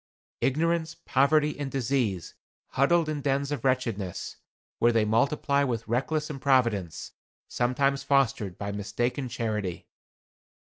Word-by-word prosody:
Ignorance, 165 +3 0
poverty 150 +3 +2
and 140 -2 -2
disease, 125 -9 -1 0.4
huddled 165 +5 +3
in 150 -2 -2
dens 140 +1 0
of 145 - -3
wretchedness, 115 -8 -1 0.4
where 120 - +4
they 115 -2 +2
multiply 140 +5 +2
with 115 -4 -2
reckless 150 +6 0
improvidence, 125 - 0 0.4
sometimes 135 +3 +1
fostered 135 -9 +1
by 100 0 -4
mistaken 120 +6 -2
charity. 105 -7 -3
130 Hz, 110 wpm, -27 LUFS, 110-140 Hz, 0.4 s, where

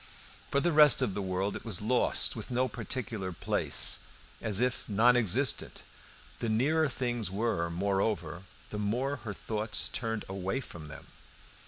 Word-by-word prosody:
For 140 - +2
the 175 +4 +1
rest 150 -3 +6
of 110 -7 -1
the 100 - -3
world 95 +1 -2
it - - -7
was 110 -7 0
lost, 120 +4 +2
with 110 - -7
no 125 +1 +1
particular 115 -5 -5
place 85 - +3 0.4
and - - -5
as 100 -1 +2
if 125 -1 -1
non 115 +4 +4
existent. 120 +4 +1 0.6
The 115 - -2
nearer 145 +8 +2
things 120 -4 -2
were, 95 -4 -1
moreover, 90 -2 -1 0.3
the 105 - -5
more 125 +7 -1
her 110 -4 -6
thoughts 110 0 -2
turned 115 -3 -3
away 95 +5 -3
from 85 - -10
them. 75 - -11
110 Hz, 160 wpm, -30 LUFS, 95-125 Hz, 0.6 s, rest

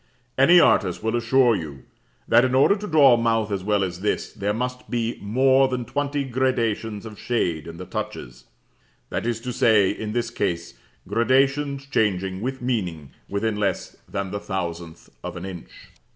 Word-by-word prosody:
Any 170 +7 +6
artist 90 - +3
will 110 +1 0
assure 120 0 +3
you 75 -7 -7 0.4
that 120 - +5
in 130 0 +1
order 140 +9 +5
to 210 0 -6
draw 145 -6 +6
a - - +4
mouth 115 -2 0
as 95 -2 -2
well 105 0 +1
as 90 -2 -4
this, 105 - -2
there 100 +1 -2
must 125 +3 -4
be 115 -1 -2
more 130 +5 +3
than 125 -2 -3
twenty 140 +3 -2
gradations 115 -5 -1
of 110 -2 -10
shade 90 -9 -1
in 85 0 -8
the 90 - -7
touches; - - -6 0.7
that - - -2
is 120 -1 -1
to 125 0 -4
say, 110 -6 +4
in 105 +1 -5
this 120 -1 -1
case, 85 0 -2 0.3
gradations 135 +4 +1
changing, 95 -7 -1
with 130 +2 -4
meaning, 90 - -3 0.2
within 105 +1 -1
less 100 -3 -2
than 100 -2 -3
the 100 - -3
thousandth 85 -4 -6
of - - -6
an 90 - -6
inch. 90 -3 -8
110 Hz, 175 wpm, -23 LUFS, 95-130 Hz, 0.7 s, Any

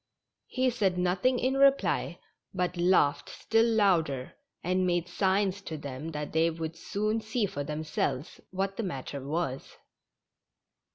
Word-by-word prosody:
He 255 0 +1
said 200 -6 +1
nothing 180 +8 +2
in 260 +2 0
reply, 275 0 +3 0.4
but 180 0 -1
laughed 170 -5 +3
still 225 +1 +2
louder, 170 - +2 0.3
and 185 +1 +1
made 175 -1 0
signs 190 +2 +1
to 160 -5 -6
them 145 +1 -6
that 150 -2 -5
they 160 +1 +3
would 165 0 -5
soon 215 +6 -1
see 220 +1 0
for 145 -7 -4
them 150 +2 -4
selves 150 -1 -2
what 195 +1 -2
the 230 - -1
matter 140 -5 -5
was. 145 -2 -3
180 Hz, 145 wpm, -29 LUFS, 155-205 Hz, 0.4 s, reply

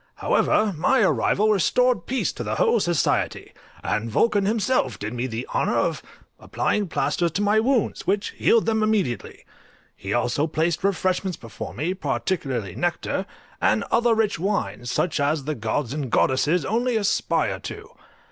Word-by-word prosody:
However, 210 -2 +2
my 255 +12 +2
arrival 210 +2 +2
restored 235 +1 +2
peace 260 +1 -1
to - - -5
the - - -2
whole 470 -1 +3
society, 175 -5 0 0.3
and 110 +2 -1
Vulcan 205 - +2
himself 215 - 0
did 105 +2 -5
me 125 +1 -2
the 115 +1 -4
honour - - +1
of - - 0 0.4
applying 210 -2 -1
plasters 170 +1 0
to 205 - 0
my 210 +1 +3
wounds, 245 0 0
which 200 +2 0
healed 230 - +2
them 220 -1 +1
immediately; 210 - -1 0.5
he 95 - -7
also 120 +6 +1
placed 160 +2 -1
refreshments 185 -2 0
before 115 -1 -8
me, 155 +8 -1
particularly 135 - -2
nectar, 175 - -2 0.3
and - - +2
other 235 -1 +3
rich 215 -6 0
wines, 120 - -2
such 160 +5 0
as 145 +1 +1
the 155 +3 -2
gods 115 +2 -2
and 145 -4 -3
goddesses 145 +7 +2
only 235 - 0
aspire 205 -2 0
to. - - -8
180 Hz, 155 wpm, -23 LUFS, 130-215 Hz, 0.5 s, whole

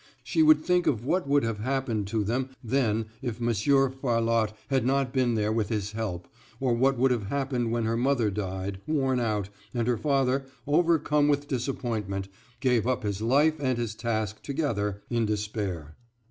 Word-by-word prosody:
She 320 - +1
would 310 0 +6
think 180 -1 +2
of 120 -2 +1
what 175 +2 0
would 145 -1 +3
have 115 -2 -2
happened 120 -4 -1
to 110 +1 0
them 125 +5 -1
then 115 -3 +1 0.2
if 120 -2 -4
Monsieur 125 +4 +2
Farlotte 115 -4 +1 0.2
had 135 -3 +2
not 135 0 +1
been 125 -3 +2
there 105 0 +1
with 110 -2 0
his 105 -3 -2
help, 105 -6 -4 0.3
or 130 -3 +1
what 130 +3 +2
would 130 +2 +3
have 115 -5 -1
happened 130 -2 -1
when 120 0 0
her 115 +1 0
mother 125 -4 +2
died, 95 -1 -4
worn 135 -4 +1
out, 105 -4 -1 0.3
and 120 -1 0
her 120 -2 +2
father, 135 +1 +1 0.2
overcome 150 -1 +3
with 145 0 +1
disappointment, 115 -7 -3 0.3
gave 125 -4 +2
up 130 -3 0
his 100 -1 -2
life 145 +7 +3
and 130 -3 0
his 115 -2 -2
task 110 -2 -2
together, 105 -9 -2
in 115 -2 +1
despair. 105 -7 -3
120 Hz, 175 wpm, -27 LUFS, 105-135 Hz, 0.3 s, would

